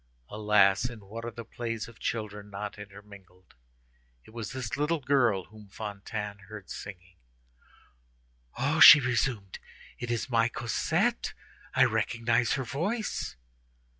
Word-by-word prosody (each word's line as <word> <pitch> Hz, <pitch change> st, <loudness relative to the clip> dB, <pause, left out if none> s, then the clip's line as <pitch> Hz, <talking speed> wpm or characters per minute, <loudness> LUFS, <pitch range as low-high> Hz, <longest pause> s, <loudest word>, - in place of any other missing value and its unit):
Alas! 105 Hz, 0 st, +3 dB
in 120 Hz, -3 st, -10 dB
what 110 Hz, +4 st, -8 dB
are 120 Hz, -, -3 dB
the 115 Hz, 0 st, -9 dB
plays 115 Hz, -1 st, -5 dB
of 115 Hz, -1 st, -15 dB
children 105 Hz, -2 st, -4 dB
not 105 Hz, +1 st, -6 dB
intermingled. 100 Hz, -3 st, -14 dB, 0.7 s
It -, -, -16 dB
was 115 Hz, -2 st, -6 dB
this 130 Hz, -1 st, -4 dB
little 150 Hz, +3 st, 0 dB
girl 125 Hz, -8 st, +2 dB
whom 105 Hz, +3 st, -15 dB
Fantine 105 Hz, 0 st, -6 dB
heard 105 Hz, -3 st, -10 dB
singing. 90 Hz, -2 st, -9 dB, 1.4 s
"Oh!" 140 Hz, +5 st, 0 dB
she 155 Hz, -, +12 dB
resumed, 120 Hz, -6 st, -1 dB, 0.4 s
"it 120 Hz, -, -5 dB
is 120 Hz, +1 st, -1 dB
my 115 Hz, -3 st, +2 dB
Cosette! 120 Hz, -1 st, -1 dB, 0.4 s
I -, -, +6 dB
recognize 115 Hz, 0 st, +1 dB
her 135 Hz, -, -1 dB
voice." 195 Hz, -, -3 dB
110 Hz, 130 wpm, -29 LUFS, 100-120 Hz, 1.4 s, she